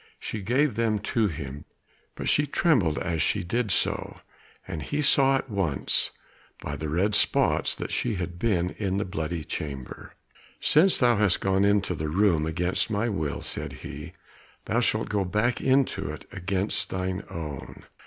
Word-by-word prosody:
She 110 - -5
gave 130 +7 +2
them 110 0 +1 0.2
to 115 -3 +3
him, 75 -4 -6 0.5
but - - -5
she 145 0 +3
trembled 125 - +2
as 85 -4 -1
she - - +1
did 115 +5 -1
so, - - 0 0.5
and 80 - -5
he 150 - -2
saw 135 -1 +5
at 135 - -2
once 95 - 0 0.5
by 75 - -5
the 75 +1 -4
red 95 +7 +1
spots - - +3
that - - -5
she 115 -3 0
had 90 -1 -5
been 90 -5 +1
in 95 -2 0
the 100 - -1
bloody 85 -3 -3
chamber. 70 -4 -6 0.4
"Since 175 +5 +4
thou 120 -3 +4
hast 105 -3 +3
gone 95 0 +2
into 100 -2 +2
the 80 -2 -3
room 85 -3 +2
against 90 +6 0
my 110 +2 0
will," 80 -8 -2
said - - -3
he, - - -8 0.5
"thou 115 - +1
shalt 110 -2 +1
go 105 -2 +1
back 105 +6 0
into 135 0 +1
it - - -7
against 95 +2 -1
thine 95 +1 -2
own. 75 -4 -7
95 Hz, 165 wpm, -26 LUFS, 85-115 Hz, 0.5 s, saw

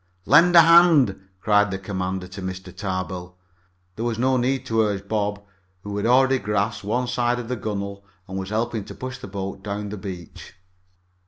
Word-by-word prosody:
"Lend 170 +8 +6
a 170 - +11
hand!" 160 - +5
cried 105 -1 +3
the 95 - -3
commander 95 -1 -4
to 95 +1 -8
Mr. 95 0 -7
Tarbill. 90 -2 -4 0.6
There 110 - -4
was 120 -2 -1
no 130 +2 +2
need 130 +1 0
to 115 -3 +1
urge 100 -2 -1
Bob, 105 -1 -2 0.4
who 105 0 -5
had 105 - 0
already 130 +2 +4
grasped 105 +1 -1
one 120 +5 0
side 120 0 0
of 120 -1 -6
the 125 - -1
gunwale 100 -2 -5 0.2
and 95 0 -4
was 95 0 -5
helping 110 0 -1
to - - -10
push 130 0 -6
the - - -8
boat 95 -1 -6
down 105 0 -4
the 105 - -6
beach. 95 -4 -9
105 Hz, 185 wpm, -23 LUFS, 95-120 Hz, 0.6 s, a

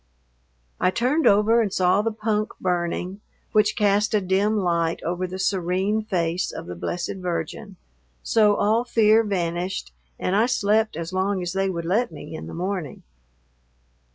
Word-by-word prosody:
I 185 - +3
turned 255 - +1
over 210 +3 +4
and 210 -4 -1
saw 185 +2 +3
the 225 +1 -1
punk 215 0 -1
burning, 180 +2 -2 0.3
which 210 -1 +3
cast 210 +1 +2
a - - +4
dim 200 +3 +1
light 170 -4 0
over 180 +2 -2
the 185 +1 -6
serene 190 +3 0
face 175 -4 -1
of - - -7
the 90 - -6
Blessed 175 - -4
Virgin, 180 +2 -4 0.5
so 210 -2 +4
all 220 +4 +2
fear 225 -2 +4
vanished 175 - -2 0.2
and 185 - -1
I 220 +3 +3
slept 215 -5 +1
as 170 +2 -5
long 190 0 0
as 175 0 -3
they 195 0 0
would 170 -3 -4
let 205 +5 +1
me 150 -1 -9
in 160 - -7
the - - -8
morning. 180 -4 -4
190 Hz, 160 wpm, -24 LUFS, 175-215 Hz, 0.5 s, over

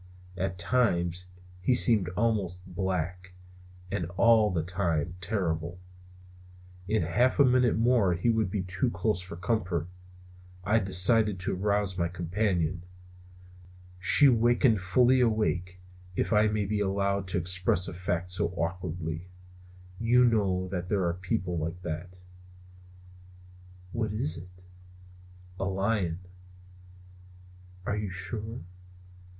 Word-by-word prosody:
At 95 0 -3
times 90 -4 +1 0.3
he 125 +7 +2
seemed 110 -8 +5
almost 100 -5 -1
black; 90 -1 -4 0.6
and 100 -4 -2
all 115 -2 +5
the 85 -4 -1
time 85 -2 -1
terrible. 85 -3 -2 1.1
In 110 -2 +1
half 120 +11 +1
a 140 - +6
minute 125 -3 +3
more 115 -6 +3
he 105 +8 +1
would 110 -4 0
be 100 -1 -2
too 90 +6 -1
close 110 -5 -1
for 90 -2 -7
comfort, 90 -3 -1 0.8
and 105 +3 +2
I - - +5
decided 95 +2 +4
to 90 - -2
arouse 100 -1 -1
my 85 - +1
companion. 90 -1 -1 1.2
She 140 +9 +7
wakened 120 -2 +3
fully 125 +8 +3
awake, 95 -6 0 0.4
if 115 - 0
I 105 +1 +4
may 105 -1 -1
be 105 +1 -1
allowed 100 -1 -1
to 90 - -2
express 90 0 0
a - - -6
fact 90 0 -3
so 90 - 0
awkwardly. 85 0 -4 0.7
You 120 +2 +4
may 120 -2 +4
know 95 -3 0
that 90 -1 -4
there 100 -3 +1
are 85 - 0
people 90 -1 -3
like 85 +3 -4
that. 85 +2 -6 1.7
"What 110 -2 -2
is 85 -7 +1
it?" 90 +1 -12 1.0
"A 95 - -1
lion." 95 -3 -1 1.6
"Are 100 - -1
you 105 -1 -3
sure?" 105 +5 -6
95 Hz, 125 wpm, -28 LUFS, 90-110 Hz, 1.7 s, She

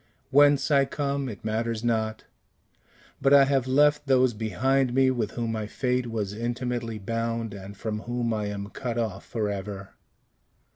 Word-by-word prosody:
"Whence 145 +1 +5
I 140 -1 +5
come 140 -1 -2
it 105 -2 -9
matters 115 +1 -1
not; 110 -2 -1 1.0
but 140 +1 +6
I 140 - +8
have 135 -2 +1
left 145 +2 +3
those 130 -2 +4
behind 120 +5 0
me 130 -1 +4
with 115 -4 -2
whom 115 -2 -2
my 110 -2 -3
fate 125 +2 -1
was 105 -4 -3
intimately 120 0 -3
bound, 115 +1 -3
and 100 0 -9
from 105 0 -3
whom 120 0 -2
I 105 -1 -2
am 100 0 -5
cut 120 -3 -4
off 110 -5 -2
forever. 100 -3 -4
115 Hz, 155 wpm, -26 LUFS, 110-130 Hz, 1.0 s, I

